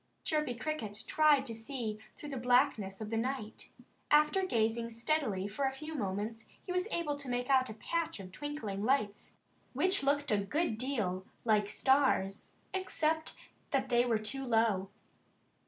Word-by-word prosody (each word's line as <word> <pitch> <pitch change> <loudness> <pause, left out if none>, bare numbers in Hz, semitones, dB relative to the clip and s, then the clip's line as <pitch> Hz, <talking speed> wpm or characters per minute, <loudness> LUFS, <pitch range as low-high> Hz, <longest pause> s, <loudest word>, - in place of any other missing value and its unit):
Chirpy 300 -5 0
Cricket 230 -6 -4
tried 300 -3 +4
to 235 - -4
see 225 -2 -4 0.2
through 295 - -8
the 275 - -4
blackness 245 -5 +2
of 215 0 -5
the 225 - 0
night. 245 -2 -3 0.4
After 300 +5 +4
gazing 230 -7 +1
steadily 230 -5 0
for 215 +7 -2
a 265 - +2
few 305 +4 -7
moments 215 -2 -3 0.2
he - - -4
was 365 +2 0
able 320 -7 -1
to 280 -2 -5
make 245 +2 -1
out 260 -1 +4
a 215 - -6
patch 330 +4 -2
of 185 -1 -9
twinkling 220 -6 -4
lights, 220 -5 0 0.4
which 370 +9 +2
looked 285 0 +1
a 210 - +3
good 220 - -1
deal 205 -8 -1 0.2
like 210 -2 +3
stars, 265 -5 +2 0.2
except 320 -4 0 0.3
that 265 -2 0
they 240 -1 +4
were 235 -3 +2
too 215 +6 -3
low. 225 -6 +2
245 Hz, 160 wpm, -33 LUFS, 215-290 Hz, 0.4 s, tried